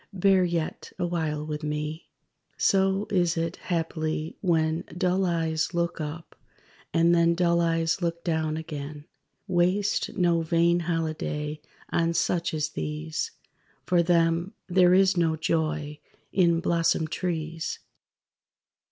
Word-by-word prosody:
Bear 190 0 +4
yet 170 -3 -2
awhile 160 -4 -1
with 150 0 -4
me._) 150 +1 -3 0.5
So 195 +1 +2
is 175 -3 +2
it, 165 +1 -2
haply, 160 -4 -2
when 160 -3 +1
Dull 185 +1 +1
eyes 165 -1 -1
look 170 -1 -1
up, 155 +2 -6 0.6
and 170 +1 +4
then 170 0 +4
Dull 170 -1 +2
eyes 165 +1 +1
look 170 -1 -2
down 160 -2 0
again. 150 -2 -6 0.4
Waste 185 +4 +1
no 175 -2 +3
vain 170 +1 +2
holiday 155 -3 -2 0.3
on 170 0 +1
such 170 0 +1
as 150 -1 -1
these; 75 - -3 0.6
For 175 -1 +3
them 170 +1 +2
there 180 -1 +5
is 190 0 +4
no 165 -2 +2
joy 155 -2 -1 0.3
in 170 -3 +3
blossomed 165 -2 +1
trees. 165 -2 -3
165 Hz, 120 wpm, -26 LUFS, 155-175 Hz, 0.6 s, there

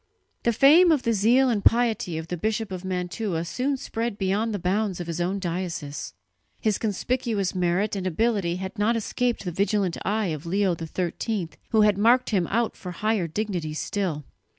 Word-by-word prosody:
The 235 - +2
fame 310 +9 +6
of 295 -5 +2
the 230 - +2
zeal 235 +6 +4
and 205 -3 -1
piety 225 -8 +2
of 160 +1 -6
the 180 - -2
Bishop 215 +3 -2
of 185 -1 -5
Mantua 180 -1 -2
soon 265 +9 -1
spread 230 -3 -3
beyond 205 +3 0
the 205 - -1
bounds 190 +1 -1
of 175 - -4
his 170 +1 -3
own 185 +3 0
diocese. 175 -5 -4 0.4
His 215 -3 0
conspicuous 220 -1 -1
merit 185 +3 0
and 190 -1 -2
ability 195 -2 +1
had 190 +3 -6
not 220 +3 +2
escaped 235 0 -1
the 175 - -2
vigilant 195 0 0
eye 210 -1 0
of 155 -2 -4
Leo 190 0 +1
XIII, 175 +3 -3 0.2
who 220 -2 +4
had 210 -2 +4
marked 240 +4 +4
him 185 -5 +1
out 230 +2 0
for 180 -1 -7
higher 210 -2 0
dignity 170 -4 -3
still. 155 -1 -2
200 Hz, 180 wpm, -25 LUFS, 175-225 Hz, 0.4 s, fame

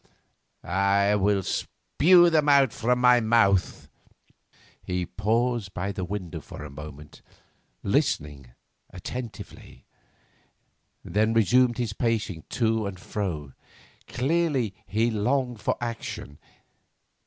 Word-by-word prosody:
I 100 +3 +2
will 100 -1 +1
spue 175 - +3
them 155 -2 +3
out 140 -4 +5
of 125 +2 +3
my 125 0 +5
mouth!' 110 -5 +2 0.9
He 90 -1 -3
paused 110 +1 -1
by 95 +3 -2
the 95 - -5
window 90 -4 -5
a 75 +1 -9
moment, 75 +1 -11 0.6
listened 70 -5 -1 0.4
attentively, 105 - -9 1.2
then 110 +4 +1
resumed 120 +2 +3
his 120 -4 -2
pacing 110 -8 -2
to 110 -3 0
and 95 -2 -7
fro. 85 -9 -4 0.5
Clearly, 135 - 0
he 110 +5 +1
longed 120 +1 -1
for - - -1
action. 115 - -6
105 Hz, 100 wpm, -26 LUFS, 95-120 Hz, 1.2 s, out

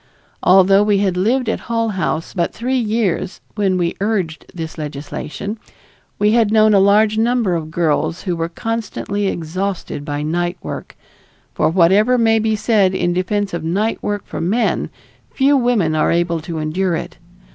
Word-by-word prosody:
Although 195 +2 +5
we 210 -1 +3
had 195 -2 +1
lived 230 +7 +1
at 225 - -1
Hull 230 -1 0
House 170 -4 -2
but 170 -2 -1
three 255 +3 -1
years 215 -5 -1
when 195 -3 +1
we 170 -1 0
urged 195 -7 -2
this 165 -3 -6
legislation, 150 +8 -6 0.6
we 210 +1 +3
had 225 -2 +3
known 215 -1 +5
a 200 - +6
large 210 +2 +4
number 230 -4 +1
of 165 -2 -2
young - - -11
girls 165 +1 0
who 180 -3 -1
were 165 0 -2
constantly 205 0 -3
exhausted 180 -2 -3
by 145 0 -3
night 175 +3 -1
work; - - -7 0.6
for - - +1
whatever 195 +8 +4
may 225 -1 +3
be 220 0 +1
said 205 -4 +2
in 175 -1 0
defense 195 +2 -1
of 170 -2 -3
night 200 +7 -1
work 205 -1 -3
for - - -6
men, 210 +8 0 0.4
few 280 +1 +2
women 240 - +2
are 155 - +2
able 170 -1 +1
to 165 +1 -6
endure 170 +4 -1
it. - - -6
195 Hz, 170 wpm, -18 LUFS, 170-220 Hz, 0.6 s, a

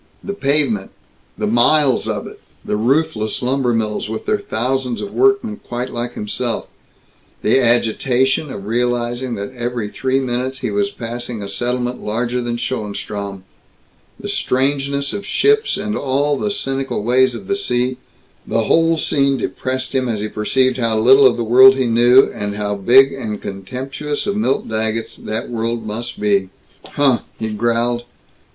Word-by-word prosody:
The 200 - -4
pavement 140 - 0 0.5
the - - -1
miles 130 +5 +3
of - - -2
it; - - -11 0.2
the - - -1
ruthless 115 -1 0
lumbermills, 120 -5 0
with 110 - -5
their 210 - +1
thousands 130 - -2
of 200 - -6
workmen 400 - +2
quite 125 -4 -5
like 120 0 -4
himself; 115 +3 -2 0.8
the - - +4
agitation 125 +4 +2
of 100 - -7
realizing 120 +2 -1
that 100 +4 -6
every 120 -3 -3
three 130 +4 0
minutes 130 +1 -3
he - - -2
was 205 0 0
passing 120 - -6
a - - -5
settlement 125 +2 -2
larger 120 +3 -1
than 120 0 -2
Schoenstrom; 100 -4 -4 0.8
the - - -6
strangeness 140 +1 0
of 200 - -4
ships 430 - +2
and 210 +1 -3
all 140 +2 0
the 210 - -2
cynical 135 - -2
ways 125 +2 +3
of - - -8
the 200 - 0
sea 125 -9 -1 0.5
the 115 - +1
whole 165 +6 +3
scene 140 -3 +1
depressed 130 0 -3
him 130 -2 0
as 110 -3 -1
he 105 - -2
perceived 130 +5 +1
how 115 -3 0
little 130 +5 +7
of 120 - +1
the 120 - -1
world 130 +4 +7
he 130 -1 0
knew, 120 +3 +6
and 105 0 -4
how 105 0 -2
big 130 +7 +5
and 110 -6 -4
contemptuous 130 +9 -5
of 200 - -1
Milt 210 -10 0
Daggetts 110 0 -2
that 110 +2 -4
world 115 0 -2
must 120 +3 -5
be. 100 -2 +1 0.4
"Huh!" 135 -4 +2 0.2
he 110 -1 -3
growled. 120 +2 0
125 Hz, 160 wpm, -18 LUFS, 115-135 Hz, 0.8 s, little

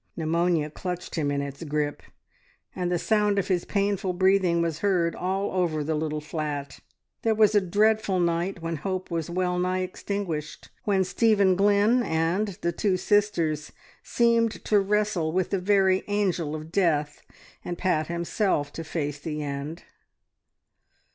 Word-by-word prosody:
Pneumonia 165 -1 +1
clutched 180 +2 -5
him 150 -4 0
in 140 0 -1
its 140 +3 -7
grip, 150 -1 -2 0.7
and 180 -1 -2
the 175 - +2
sound 210 +2 +1
of 200 -1 0
his 180 -2 +1
painful 200 -2 0
breathing 185 -1 +3
was 165 -2 -1
heard 180 -4 +1
all 190 +2 -2
over 170 -5 0
the 160 +2 -1
little 155 0 -2
flat. 150 -2 -4 0.4
There 225 -1 +2
was 215 -1 +4
a 205 - +5
dreadful 205 +1 +2
night 170 +1 -1
when 165 -1 -2
hope 185 +4 -4
was 165 -2 -2
well 180 0 0
nigh 185 +1 0
extinguished, 185 -4 -4 0.2
when 195 -2 +2
Stephen 200 -2 +3
Glynn 205 +5 +4
and 165 +2 0 0.2
the 170 - +1
two 185 +2 0
sisters 175 -8 +1 0.3
seemed 230 -1 +1
to 210 - +4
wrestle 200 -5 0
with 185 -1 0
the 195 - +1
very 190 0 +3
angel 185 -7 0
of 155 +1 -8
death, 150 -6 +1 0.4
and 175 - -4
Pat 160 -5 0
himself 170 -3 -1
to 165 - -5
face 150 -3 -3
the 150 0 -4
end. 145 +3 -5
180 Hz, 155 wpm, -26 LUFS, 160-200 Hz, 0.7 s, a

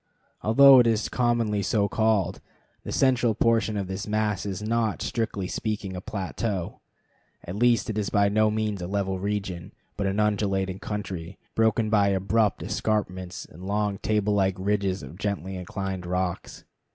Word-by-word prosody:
Although 135 +4 +8
it 120 - +5
is 110 -1 +1
commonly 120 -4 +1
so 100 +1 +1
called, 110 -4 +1 0.4
the - - -6
central 125 -4 +2
portion 110 -1 +2
of 100 - -1
this 95 +2 -5
mass 105 -1 -1
is 100 +1 -4
not, 115 -1 0
strictly 105 -5 -2
speaking, 105 -2 -3
a 90 - -5
plateau; 100 -1 -3 0.6
at 90 - -6
least 120 +2 +3
it 110 -2 -2
is 100 - -1
by 100 -1 +3
no 110 +1 +3
means 105 -2 -2
a 85 - -4
level 95 -1 -1
region, 95 -3 -3 0.2
but 100 -1 0
an 95 +2 -1
undulating 100 -3 0
country, 100 -5 -5 0.2
broken 110 -1 +2
by 105 -2 +4
abrupt 100 +2 +1
escarpments 95 -3 -2
and 85 +4 -14
long 105 0 -1
table 105 -1 +1
like 95 -2 +2
ridges 100 -1 -1
of 75 +7 -10
gently 100 -2 -3
inclined 95 0 -4
rocks. 90 0 -3
100 Hz, 160 wpm, -26 LUFS, 95-110 Hz, 0.6 s, Although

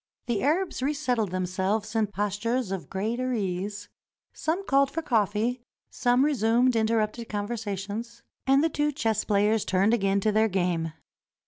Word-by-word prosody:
The 235 -5 -1
Arabs 330 +2 0
resettled 255 -7 0
themselves 190 +4 -1
in 220 -1 +2
postures 205 +3 -1
of 190 -3 -4
greater 235 +6 -2
ease; 205 0 -3 0.5
some 350 +5 -2
called 275 -4 +3
for 330 +3 -4
coffee, 225 0 +1 0.3
some 245 +2 +2
resumed 245 -2 +3
interrupted 220 0 0
conversations, 210 +2 -4 0.2
and 270 +2 +5
the - - +4
two 295 0 0
chess 225 -6 0
players 210 +1 +2
turned 195 +4 +2
again 195 -3 +2
to 215 - +2
their 220 +1 +3
game. 175 -4 -1
220 Hz, 140 wpm, -27 LUFS, 200-250 Hz, 0.5 s, and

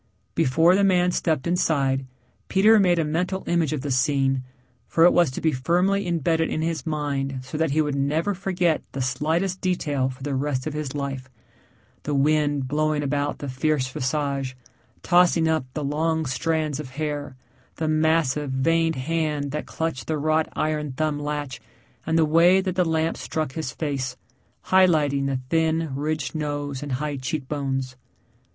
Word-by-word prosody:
Before 160 +7 +4
the 200 +1 +3
man 180 -2 +3
stepped 155 -6 0
inside, 140 -6 +1 0.4
Peter 215 +3 +5
made 180 -3 +3
a 165 - +1
mental 180 +5 -1
image 170 -4 +1
of 150 -3 -2
the 140 0 -3
scene, 135 0 +2 0.5
for 165 - +3
it 175 - +6
was 170 -4 +4
to 130 - -6
be 160 - +2
firmly 180 +9 +1
imbedded 165 -1 +1
in 155 - -2
his 165 -4 -2
mind 140 -3 -2
so 130 +3 -9
that 160 +1 +1
he 155 +3 +2
would 145 -1 -2
never 150 +8 0
forget 180 -3 0
the 135 - -3
slightest 160 +9 -1
detail 145 -8 0
for 130 0 -10
the 145 0 -2
rest 135 -1 -1
of 155 - -3
his 150 -2 -4
life 135 -2 -4 0.7
the 145 - -2
wind 145 -1 +2
blowing 150 +1 0
about 145 +1 -1
the 145 - -6
fierce 130 +1 0
visage, 135 0 -2 0.5
tossing 175 -2 +4
up 160 -4 +1
the 150 - -2
long 160 +3 0
strands 155 +1 -1
of 145 -4 -6
hair; 145 -3 -3 0.4
the 160 - -2
massive, 155 -2 +1
veined 165 +5 +1
hand 150 0 -1
that 150 +1 -4
clutched 160 -5 -3
the 155 - 0
wrought 155 +2 +1
iron 150 -2 -1
thumb 150 +1 -1
latch, 145 -4 -4 0.5
and 160 - +2
the 160 - +4
way 170 +4 +5
that 190 -1 -1
the 185 0 +2
lamp 160 0 0
struck 155 -4 -3
his 150 -2 -4
face, 135 -4 -3 0.5
highlighting 155 -7 +3
the 135 -2 -1
thin, 160 -2 +1
ridged 150 +2 -2
nose 145 -3 -3
and 145 -2 -4
high 145 +2 -2
cheekbones. 135 -2 -3
150 Hz, 170 wpm, -24 LUFS, 140-165 Hz, 0.7 s, it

